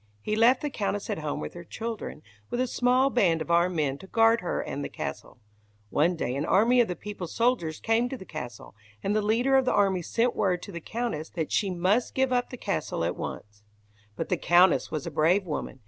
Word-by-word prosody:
He 210 - -2
left 240 +4 +4
the 295 - -2
Countess 205 -2 -2
at - - -2
home 150 -2 -3
with - - -6
her 175 - -9
children, 220 -4 -6 0.3
with 240 - -2
a 255 - +2
small 255 +2 +2
band 180 -10 +3
of 160 +2 -4
armed 170 +1 +3
men 140 -3 0
to 190 - -12
guard 225 +2 +4
her 180 - -2
and 145 - -4
the - - -4
castle. - - -6 0.5
One 170 +5 +2
day 130 -5 -2
an 140 - -1
army 230 +9 +4
of 235 - +2
the 180 - -3
people's 190 -2 -7
soldiers 230 -10 +1
came 230 +2 +1
to 265 - -5
the 190 - -11
castle, 125 - -8 0.3
and 205 - 0
the 215 - +2
leader 235 +6 +2
of 265 - +2
the 255 - +2
army 195 -3 +2
sent 235 +8 0
word 180 -3 0
to - - -8
the 170 -2 -7
Countess 225 -7 -3
that 160 -3 -2
she 200 - +1
must 185 +7 +1
give 265 -1 +2
up 245 0 +1
the 250 - -8
castle 190 - -2
at 85 +1 -1
once. 105 0 -7 0.5
But - - -4
the - - +1
Countess 175 +1 +4
was 155 -3 -4
a 170 - -4
brave 170 +6 +2
woman. 150 -4 -5
190 Hz, 230 wpm, -27 LUFS, 160-235 Hz, 0.5 s, left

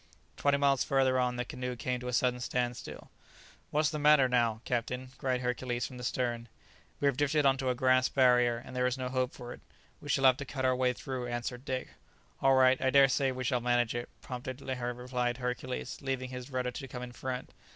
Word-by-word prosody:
Twenty 145 0 +2
miles 140 -2 +3
further 130 -1 +2
on 125 -1 +1
the 125 0 -2
canoe 125 +1 -5
came 125 +1 -2
to 125 - -7
a - - -2
sudden 125 0 +1
standstill. 120 0 -3 0.6
"What's 155 +1 +1
the 155 - -3
matter 150 -2 +6
now, 120 -3 +1
captain?" 125 +1 -2
cried 130 -1 0
Hercules 125 0 -2
from 130 - -8
the 125 - -8
stern. 120 -1 -2 0.5
"We - - -1
have 140 -2 +3
drifted 145 0 +2
on 135 -1 +5
to 130 -1 -1
a 125 - +1
grass 130 0 +3
barrier, 125 -2 +4
and 125 +2 -10
there 125 0 +2
is 125 +1 -1
no 130 -1 -3
hope 130 0 0
for 120 -1 -8
it, - - -14 0.4
we 145 - -9
shall 135 -1 +2
have 130 -1 +6
to 140 - -5
cut 130 -1 -3
our 130 0 +3
way 125 0 +2
through," 130 -1 -5
answered 120 +2 -4
Dick. 130 -1 -3 0.5
"All 135 0 +5
right, 130 0 +5
I 130 - +2
dare 135 0 +6
say 135 0 +1
we 130 0 -4
shall 125 0 0
manage 120 -1 +1
it," 120 0 -4
promptly 125 0 -5 0.2
replied 125 0 -2
Hercules, 125 0 -4
leaving 130 -2 -3
his 125 +1 -7
rudder 125 -2 -2
to 135 +2 -7
come 125 0 -7
in 125 - -7
front. 125 +1 -5
125 Hz, 220 wpm, -31 LUFS, 125-130 Hz, 0.6 s, matter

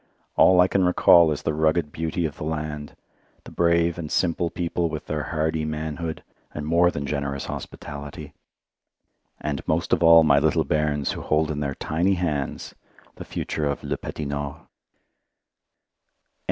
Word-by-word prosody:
All 95 -1 +6
I 90 - +6
can 95 0 +1
recall 85 -2 +6
is 75 - -3
the 80 - 0
rugged 80 0 +1
beauty 80 +2 -2
of 75 - -4
the - - -6
land, 75 -1 -4 0.5
the - - -12
brave 85 0 +2
and 80 -3 -6
simple 85 -1 +1
people 85 -1 -2
with - - -6
their 75 -1 -2
hardy 80 0 -1
manhood 80 +1 -4 0.3
and 75 - -4
more 85 +3 +4
than 70 -4 -4
generous 70 0 -3
hospitality, 70 0 -8 1.1
and 75 -2 -3
most - - 0
of - - +2
all 85 -1 +8
my 70 -2 +5
little 75 0 +2
bairns 75 -2 0
who - - -5
hold 75 0 +1
in 75 - -3
their 70 -1 -2
tiny 90 +5 0
hands 75 -7 -3 0.4
the - - -8
future 75 -1 -3
of 70 - -3
Le - - -2
Petit 75 - -6
Nord. 70 +1 -4
80 Hz, 160 wpm, -24 LUFS, 75-85 Hz, 1.1 s, all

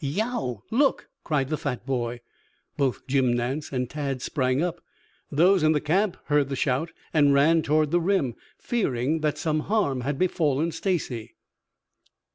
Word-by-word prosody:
"Yeow! 160 - -2
Look!" 275 +4 +2
cried 140 -4 0
the 155 - -2
fat 125 -4 -4
boy. 120 -2 -2 0.5
Both 135 -3 -1
Jim 130 -2 +2
Nance 125 +5 -2
and 125 -2 -1
Tad 140 -2 -3
sprang 130 -2 0
up. 175 -1 -3 0.5
Those 180 +5 +4
in 155 0 +4
the 150 - +2
camp 180 +6 +1
heard 145 -1 +2
the 135 - -2
shout 135 +5 0 0.2
and 145 -3 +4
ran 160 +4 +4
toward 155 0 +1
the 175 0 +3
rim, 170 -9 +1 0.2
fearing 150 - -1
that 155 -1 0
some 155 -1 0
harm 150 - 0
had 135 +2 -2
befallen 160 -3 +1
Stacy. 150 - -3
150 Hz, 155 wpm, -25 LUFS, 130-165 Hz, 0.5 s, Those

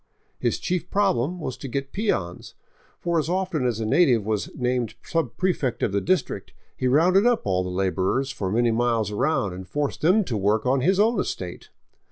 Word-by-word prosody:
His - - 0
chief 180 -1 -2
problem 180 -5 +1
was 130 -6 -4
to 140 - -7
get 135 +2 -4
peons; 95 - -2 0.4
for 170 -1 0
as 155 +1 -2
often 180 -7 0
as 115 -3 -1
a 110 - -2
native 120 - +3
was 105 -2 -1
named 125 -3 -1
subprefect 160 -2 -1
of - - +1
the 100 0 0
district, 180 - -1 0.2
he 130 - -1
rounded 180 - +4
up 245 -2 +1
all 90 -2 +1
the 90 - -4
laborers 95 +8 0
for 95 -6 -3
many 120 +2 +2
miles 115 -2 +1
around 105 - 0
and 95 +1 -8
forced 145 +7 -2
them 185 +8 +4
to 130 -10 -3
work 105 +3 +1
on 130 +1 +2
his 185 +8 +2
own 220 0 +3
estate. 90 - -5
130 Hz, 190 wpm, -24 LUFS, 105-175 Hz, 0.4 s, rounded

